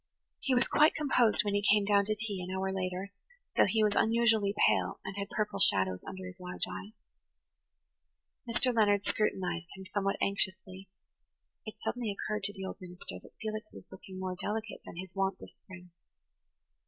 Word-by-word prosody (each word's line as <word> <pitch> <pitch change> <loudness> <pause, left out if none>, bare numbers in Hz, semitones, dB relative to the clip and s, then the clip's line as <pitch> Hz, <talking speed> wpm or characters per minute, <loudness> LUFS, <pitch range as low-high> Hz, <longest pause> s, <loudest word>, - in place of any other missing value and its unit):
He 265 - +1
was 245 - +3
quite 305 +2 +4
composed 255 -9 +3
when 205 - 0
he 205 - +2
came 205 0 +4
down 200 0 +4
to 215 +1 0
tea, 210 -3 -3
an 180 - -6
hour 190 0 -1
later, 185 +1 -3 0.4
though - - +5
he 220 +2 +2
was 210 -1 +3
unusually 225 -3 +3 0.2
pale - - +1
and 195 - -5
had 200 0 -4
purple 210 -1 -2
shadows 95 -1 +4
under 190 -1 -7
his 185 0 -9
large 180 0 -5
eyes. 95 +3 -8 1.5
Mr. 245 +2 +2
Leonard 205 -2 +3
scrutinized 175 -5 -1
him 190 0 -10
somewhat 195 -1 0
anxiously; 190 -1 0 0.8
it 215 - -6
suddenly 240 -2 -2
occurred 210 +1 -3
to 205 - -3
the 190 -1 -6
old - - -6
minister 180 - -7
that - - -17
Felix 215 0 -5
was - - -11
looking 190 0 -10
more 185 -1 -3
delicate 215 +3 -4
than - - -8
his 185 +1 -7
wont 195 -1 0
this - - -12
spring. 180 -2 -14
200 Hz, 180 wpm, -31 LUFS, 185-215 Hz, 1.5 s, though